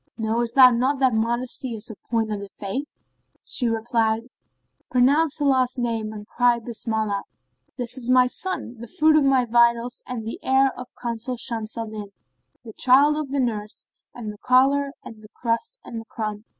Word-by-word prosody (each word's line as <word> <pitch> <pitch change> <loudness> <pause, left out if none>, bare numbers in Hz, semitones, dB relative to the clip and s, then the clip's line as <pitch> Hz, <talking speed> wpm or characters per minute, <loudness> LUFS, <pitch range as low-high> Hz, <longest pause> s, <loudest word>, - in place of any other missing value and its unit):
Knowest 230 +1 -1
thou 255 -2 +9
not 255 +4 +1
that 260 -2 +3
modesty 235 +2 -2
is 220 +1 -6
a - - -9
point 225 -2 0
of 210 - -2
the 200 0 -8
Faith?" 210 +11 -6 0.5
She 245 - +1
replied, 225 0 0 0.6
"Pronounce 285 +5 +3
Allah's 260 -3 +2
name[FN#32] 225 -3 -2
and 210 0 -8
cry 245 +2 +2
Bismillah! 220 -3 -2 0.6
this 245 +1 -4
is 245 -1 -5
my 255 0 +6
son, 250 -3 -3
the 235 - -8
fruit 310 +6 +3
of 305 - +5
my 265 -2 +3
vitals 235 +1 +2
and 240 -3 -5
the 225 - -5
heir 265 0 +3
of 250 - -10
Consul 240 +1 -4
Shams 225 -1 -3
al 230 - -2
Din, 215 -1 -7 0.6
the 220 - -9
child 275 +6 +5
of 300 -2 -3
the 280 +1 -1
nurse 215 -4 -3 0.3
and 220 -3 -6
the 205 - -16
collar 275 +3 +3
and 220 -2 -11
the 215 - -14
crust 230 -1 -2
and 230 -1 -6
the - - -14
crumb." 215 -1 -5
240 Hz, 180 wpm, -23 LUFS, 225-255 Hz, 0.6 s, thou